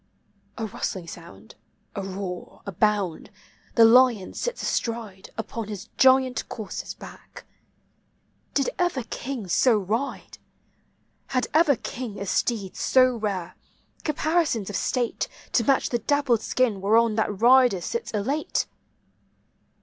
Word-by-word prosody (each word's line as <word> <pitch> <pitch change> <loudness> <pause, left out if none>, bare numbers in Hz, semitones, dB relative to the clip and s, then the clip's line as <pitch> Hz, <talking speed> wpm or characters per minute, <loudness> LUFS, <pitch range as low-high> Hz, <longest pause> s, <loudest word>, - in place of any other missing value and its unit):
A 225 - -2
rustling 190 -3 -4
sound, 110 - -12 0.4
a 200 - -2
roar, 190 -2 -6
a 200 - -4
bound, 200 -3 0 0.2
— - - -32
the 230 - +8
lion 235 -4 +5
sits 485 0 -3
astride 225 -5 -3
Upon 225 0 -4
his 210 0 -7
giant 260 -1 +4
courser's 215 -4 -6
back. - - -12 1.1
Did 275 - +2
ever 350 -8 +1
king 250 -6 -4
so 225 +6 +4
ride? 220 +8 -3 0.9
Had 255 -2 0
ever 310 -2 +5
king 235 -2 -6
a 200 - -4
steed 200 -1 -1
so 255 -1 +4
rare, 195 -6 -3 0.5
caparisons 305 - 0
of - - -6
state 245 -3 -1 0.2
To 235 - +3
match 270 +3 +2
the 240 - 0
dappled 260 -2 +1
skin 230 -7 0
whereon 225 +3 +4
that 210 -3 -1
rider 245 -3 +6
sits 470 - -4
elate? 260 +9 -1
225 Hz, 125 wpm, -25 LUFS, 200-260 Hz, 1.1 s, the